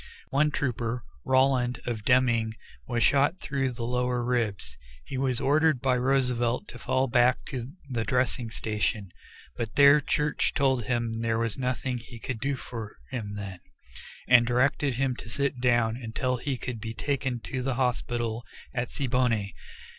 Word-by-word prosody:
One 150 +3 +3
trooper, 120 -4 -2 0.2
Rowland, 130 -2 +2
of 115 -4 -3
Deming, 120 -3 +3 0.3
was 120 -2 +1
shot 145 +6 +3
through 135 -4 -1
the 120 -1 -5
lower 125 0 0
ribs; 110 - -1 0.3
he - - -6
was 130 -2 0
ordered 155 0 +3
by 130 0 +2
Roosevelt 125 -2 +1
to 125 - -10
fall 130 +1 +1
back 125 0 +3
to 130 -2 -5 0.2
the 120 -4 -2
dressing 125 -1 0
station, 105 -3 -2 0.4
but 115 -2 -4
there 140 +1 +7
Church 150 +2 0
told 130 -4 +2
him 115 -2 -1
there 115 -1 +1
was 115 -2 -1
nothing 125 -1 -2
he 120 0 -11
could 115 0 -5
do 140 +3 0
for 115 -4 -7
him 105 -6 -4
then, 100 -3 -6 0.7
and 120 -2 +6
directed 130 +2 +2
him 130 0 0
to 110 - -9
sit 140 +1 -1
down 120 -3 +3
until 125 +2 -2
he 135 +1 -2
could 120 -3 -5
be 110 0 -5
taken 130 0 -1
to 130 +2 -4
the 130 0 -1
hospital 120 -2 -1 0.3
at 125 -2 -2
Siboney. 120 -6 0
125 Hz, 160 wpm, -28 LUFS, 115-130 Hz, 0.7 s, there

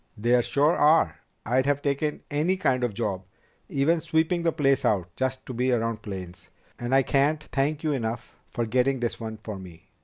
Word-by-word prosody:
"There 120 +3 +3
sure 145 +6 +2
are. 155 +2 +4 0.3
I'd 130 +4 +1
have 145 0 +1
taken 145 +1 -1
any 160 +6 +1
kind 130 -9 +1
of 115 -5 -1
job, 100 -5 -2 0.5
even 155 +5 +2
sweeping 160 +2 +1
the 170 -1 +2
place 140 -4 +2
out, 90 -4 0
just 130 0 -2
to 130 - -6
be 125 +2 +1
around 115 -2 0
planes. 95 -4 -8 0.3
And 120 +2 0
I 135 - +5
can't 145 +4 +1
thank 145 +3 0
you 155 - +1
enough 115 -4 -3
for 120 - -2
getting 130 +3 +1
this 120 -1 -2
one 110 -1 -5
for 105 -3 -6
me." 90 -3 -13
130 Hz, 190 wpm, -26 LUFS, 115-145 Hz, 0.5 s, I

